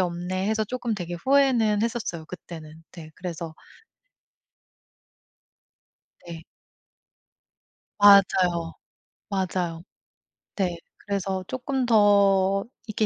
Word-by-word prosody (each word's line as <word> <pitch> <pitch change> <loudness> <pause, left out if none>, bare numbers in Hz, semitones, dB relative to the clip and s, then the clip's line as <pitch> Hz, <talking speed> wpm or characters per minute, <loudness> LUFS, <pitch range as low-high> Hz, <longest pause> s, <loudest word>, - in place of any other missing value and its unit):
없네.' 180 +1 -2
해서 220 0 +1
쪼끔 240 0 -3
되게 175 -3 -5
후회는 235 -1 +2
했었어요 220 -9 -3
그때는. 160 -3 -11
네. 160 -3 -11
그래서 170 -3 -6 2.7
네. 165 -1 -8 1.6
맞아요. 185 -4 +5 0.6
맞아요. 180 -4 -2 0.7
네. 180 -4 -1 0.2
그래서 195 -2 -3
쪼끔 260 0 -2
더 200 -3 +4 0.2
이렇게 215 +1 0
190 Hz, 180 characters per minute, -25 LUFS, 175-215 Hz, 2.7 s, 맞아요